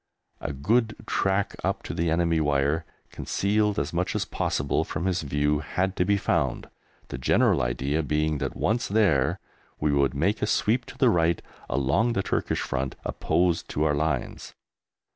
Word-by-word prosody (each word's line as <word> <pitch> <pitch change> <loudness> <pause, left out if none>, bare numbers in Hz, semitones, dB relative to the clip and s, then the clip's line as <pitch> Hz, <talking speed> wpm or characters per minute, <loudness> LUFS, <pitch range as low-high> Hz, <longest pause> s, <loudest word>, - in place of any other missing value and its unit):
A 75 - -4
good 110 - +1
track 95 +1 0
up - - -1
to - - -5
the 85 0 0
enemy 85 0 +2
wire, 75 +2 +1 0.3
concealed 105 +1 0
as - - -2
much 90 +2 -1
as - - 0
possible 70 +1 -1
from 80 +4 -4
his 95 -2 0
view, 75 0 0
had 95 +5 -2
to 90 - +2
be 100 +1 +3
found, 75 -9 -1 0.4
the - - -5
general 65 - +3
idea 65 +6 0
being 75 0 0
that 70 -2 -3
once 115 +4 0
there 95 -11 +2 0.4
we 75 -1 +1
would 70 -2 +2
make 95 +10 0
a 105 - +1
sweep 120 +3 +1
to - - -11
the 130 -4 +4
right 85 -2 +2 0.3
along 85 - +1
the 100 - 0
Turkish - - -1
front 65 0 -2
opposed 85 -1 0
to 75 - -1
our 75 -2 +2
lines. 75 +2 -2
80 Hz, 170 wpm, -26 LUFS, 70-100 Hz, 0.4 s, the